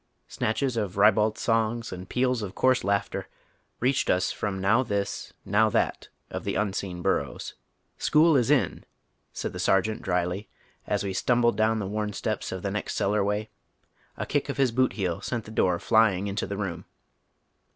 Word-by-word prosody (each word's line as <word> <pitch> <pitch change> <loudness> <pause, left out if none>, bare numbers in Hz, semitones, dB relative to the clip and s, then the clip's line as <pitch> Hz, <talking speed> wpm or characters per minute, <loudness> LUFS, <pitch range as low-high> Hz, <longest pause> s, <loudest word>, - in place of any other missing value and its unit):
Snatclies 120 +2 -1
of 100 -4 -2
ribald 105 +2 +4
songs 115 -1 0
and 90 0 -8
peals 125 -1 +1
of 100 -3 -6
coarse 130 -1 +3
laughter 100 +1 -1 0.5
reached 130 +2 +1
us 90 0 +2
from 100 -2 -3
now 100 +6 +3
this, 100 -5 -3
now 110 +2 +3
that - - -1 0.2
of - - -4
the - - -2
un 100 -2 0
seen 90 -3 -4
bun'ows. - - -1 0.2
" - - -46
School 155 +1 +4
is 125 -2 +3
in," 145 -3 +2 0.5
said - - -4
the - - -6
Sergeant 105 +3 +2
drily 90 +2 -1 0.4
as - - 0
we 100 -1 -2
stumbled 120 +3 +2
down 110 +1 +2
the 105 - -2
worn 105 +1 -2
steps 95 - -3
of 95 -1 -5
the 100 - -1
next 105 +1 -3
cellar 105 +1 +1
way. 105 +2 -2 0.7
A - - -3
kick - - -1
of - - -3
his 135 -3 +3
boot 130 +2 +2
heel 90 -5 -2
sent 120 -3 -3
the 110 - -10
door 90 -5 +2
flying 105 -1 +3
into 100 +1 -2
the 100 - -4
room. 95 -5 -4
105 Hz, 180 wpm, -27 LUFS, 95-115 Hz, 0.7 s, ribald